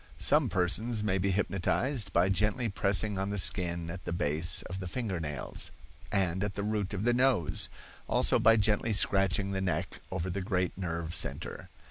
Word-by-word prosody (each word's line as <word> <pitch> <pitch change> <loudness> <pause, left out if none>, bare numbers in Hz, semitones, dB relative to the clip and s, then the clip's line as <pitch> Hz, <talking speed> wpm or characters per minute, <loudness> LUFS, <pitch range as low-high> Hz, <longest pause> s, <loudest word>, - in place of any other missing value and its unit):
Some - - +3
persons 105 +5 +1
may 95 -2 +1
be 100 +2 +1
hypnotized 100 +4 0
by 85 +2 +3
gently 105 +5 +1
pressing 100 0 +1
on 95 +1 -1
the 100 - -2
skin 85 -3 0
at 90 0 -8
the - - -4
base 85 -1 +1
of 95 +1 -6
the 95 - -5
finger 100 -3 -3
nails, 75 -4 -3 0.4
and 95 -2 0
at 100 -2 -3
the 100 - -2
root 105 -1 -1
of 100 - -3
the 120 +1 +3
nose; 125 - +2 0.4
also - - +3
by 115 +1 +6
gently 110 +1 +1
scratching 95 0 +2
the 95 -1 -2
neck 90 -1 -2
over 95 0 -3
the 100 +2 -3
great 90 -2 -1
nerve 85 -3 -3
center. 70 +2 -1
95 Hz, 180 wpm, -30 LUFS, 90-105 Hz, 0.4 s, by